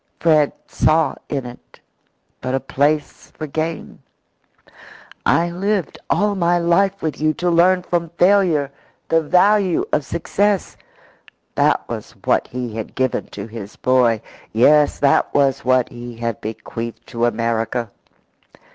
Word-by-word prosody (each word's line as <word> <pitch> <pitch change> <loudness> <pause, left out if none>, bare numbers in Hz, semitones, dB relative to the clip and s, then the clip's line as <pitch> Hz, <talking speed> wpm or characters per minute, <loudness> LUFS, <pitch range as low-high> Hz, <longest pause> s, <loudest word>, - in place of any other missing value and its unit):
Fred 155 -3 +3
saw 160 0 +2 0.2
in 135 -3 -2
it 120 0 -12 0.6
but 130 +1 -2
a - - +1
place 145 +3 -1
for 155 - -4
gain. 160 +2 -4 1.3
"I 170 +1 +2
lived 195 0 -2
all 205 0 +2
my 175 -2 +2
life 185 +3 +1
with 155 -2 -3
you 155 0 +2
to 180 -1 0
learn 180 +2 +4
from 170 -2 -1
failure 175 -7 +3 0.4
the 165 - +3
value 185 +3 +3
of 150 - +2
success." 195 +7 -1 0.8
That - - +1
was - - -7
what - - +2
he 125 -2 -5
had 110 -2 -6
given 130 -1 -1
to - - -8
his 110 -2 -9
boy. 120 -3 +2 0.3
Yes, 145 +6 +4
that 140 -1 +2
was 135 -1 +2
what 130 -1 +2
he 120 -1 -9
had 115 -2 -3
bequeathed 115 +1 -6
to 120 -1 0
America. 115 0 -1
150 Hz, 135 wpm, -20 LUFS, 120-175 Hz, 1.3 s, learn